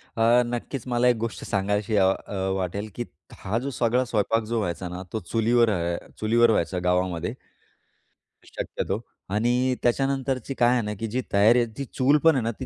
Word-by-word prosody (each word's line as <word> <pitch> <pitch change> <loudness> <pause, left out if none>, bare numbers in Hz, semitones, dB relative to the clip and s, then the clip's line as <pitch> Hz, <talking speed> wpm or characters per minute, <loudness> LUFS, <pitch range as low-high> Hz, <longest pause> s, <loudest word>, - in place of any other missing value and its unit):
अ, 115 +2 +4
नक्कीच 120 +1 -4
मला 125 0 +2
एक 125 - +4
गोष्ट 115 0 -4
सांगाविशी 105 +2 0
अ 95 - +5 0.2
अ - - -6 0.2
वाटेल, 95 +3 -3
की 120 - -3 0.3
हा 105 +4 -2
जो, 135 - -4
सगळा 125 0 +1
स्वयंपाक 115 -1 0
जो 115 0 0
व्हायचा 90 -2 -3
ना, 90 +1 -6
तो 110 - -1
चुलीवर 115 +4 +2
अ, 85 -4 -1 0.2
चुलीवर 115 +1 +4
व्हायचा 90 -2 0
गावामध्ये. 90 -1 0 1.1
शक्यतो 100 - -4 0.4
आणि 125 +4 +2
त्याच्यानंतरची 135 0 0
काय 120 -2 +3
आहे 125 - +2
ना, 105 0 -3
की 115 - -2
जी 125 +4 -2
तयारी 110 +5 +5
आहे, 120 - +1
ती 140 - -3
चूल 135 +3 +2
पण 165 -2 +6
आहे 130 - 0
ना, 115 - 0
ती 130 - -4
115 Hz, 185 wpm, -25 LUFS, 100-125 Hz, 1.1 s, पण